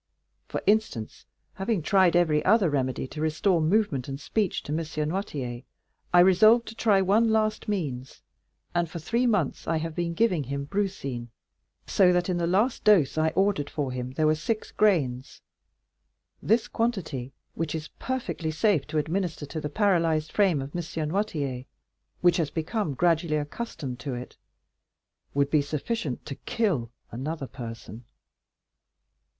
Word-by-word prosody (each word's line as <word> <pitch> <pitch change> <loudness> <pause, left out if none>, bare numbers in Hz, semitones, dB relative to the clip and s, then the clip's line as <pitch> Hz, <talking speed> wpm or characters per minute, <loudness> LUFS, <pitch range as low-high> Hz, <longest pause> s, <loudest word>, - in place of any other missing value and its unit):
For - - -4
instance, 205 - 0 0.3
having 195 -3 -1
tried 185 -1 +4
every 160 -4 +3
other 195 -4 +4
remedy 130 -3 -1
to 155 - -6
restore 160 +3 +2
movement 155 - +1
and 135 0 -5
speech 200 +5 -1
to - - -7
M. 155 - 0 0.3
Noirtier, 140 - -4 0.5
I 175 - +6
resolved 215 +6 +6
to - - -8
try 205 -4 +3
one 220 +4 +3
last 215 -1 +1
means, 140 -11 -4 0.5
and 175 -2 0
for 170 - -6
three 235 +10 0
months 205 - 0
I 165 - +1
have 165 0 -3
been 170 0 -2
giving 180 -8 +2
him 140 +2 -3
brucine; 140 -10 -3 0.6
so 185 -3 +4
that 180 +1 +1
in 180 - 0
the 170 - 0
last 210 +8 +1
dose 190 -10 +5
I 155 0 +2
ordered 190 -7 +1
for 140 -4 -2
him 125 0 -5
there 155 +3 +1
were 155 - +5
six 215 +8 -3
grains. 140 -12 +1 1.0
This 225 +2 +2
quantity, 165 - -2 0.2
which 165 -1 -3
is 155 -1 -5
perfectly 255 -11 -3
safe 155 -1 +1
to 155 - -3
administer 160 0 -1
to 155 +2 -5
the 150 - -3
paralyzed 165 -4 +1
frame 185 -9 +2
of 140 +4 -9
M. 175 - -1 0.3
Noirtier, 145 -9 -2 0.6
which 175 0 +4
has 160 -4 0
become 165 - -2
gradually 165 0 +2
accustomed 145 - -5
to 130 +2 -4
it, 125 +1 -8 1.0
would 140 0 +2
be 150 - +4
sufficient 150 - -3
to 140 - -5
kill 145 - -1 0.2
another 140 +4 -4
person." 115 -3 -9
165 Hz, 155 wpm, -27 LUFS, 140-200 Hz, 1.0 s, I